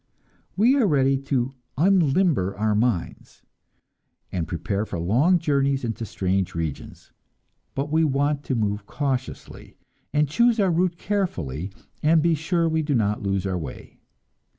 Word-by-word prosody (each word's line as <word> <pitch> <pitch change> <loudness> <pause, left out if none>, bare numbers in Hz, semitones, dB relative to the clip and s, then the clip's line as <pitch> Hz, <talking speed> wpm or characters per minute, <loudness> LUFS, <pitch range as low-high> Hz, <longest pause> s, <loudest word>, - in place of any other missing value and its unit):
We 235 +7 +5
are 240 -6 +3
ready 135 -4 +3
to 135 -1 -1 0.2
unlimber 160 - +2
our 110 0 +1
minds, 105 -4 -2 0.9
and 85 -4 -2
prepare 100 +5 -2
for 100 - -5
long 125 - +3
journeys 140 -4 +1
into 115 -1 -3
strange 95 -1 -1
regions, 80 -3 -5 0.6
but 140 +2 -2
we 160 +1 +3
want 145 0 +1
to 130 - -1
move 105 -2 -2
cautiously, 135 -3 -4 0.3
and 150 0 +2
choose 235 - +3
our 195 -3 +3
route 175 +1 +1
carefully, 95 - -2 0.3
and 160 +2 +4
be 165 +2 +3
sure 165 +2 0
we 160 0 +1
do 145 -2 0
not 105 -3 0
lose 100 -1 -1
our 95 -2 -1
way! 75 -6 -9
135 Hz, 145 wpm, -24 LUFS, 100-160 Hz, 0.9 s, We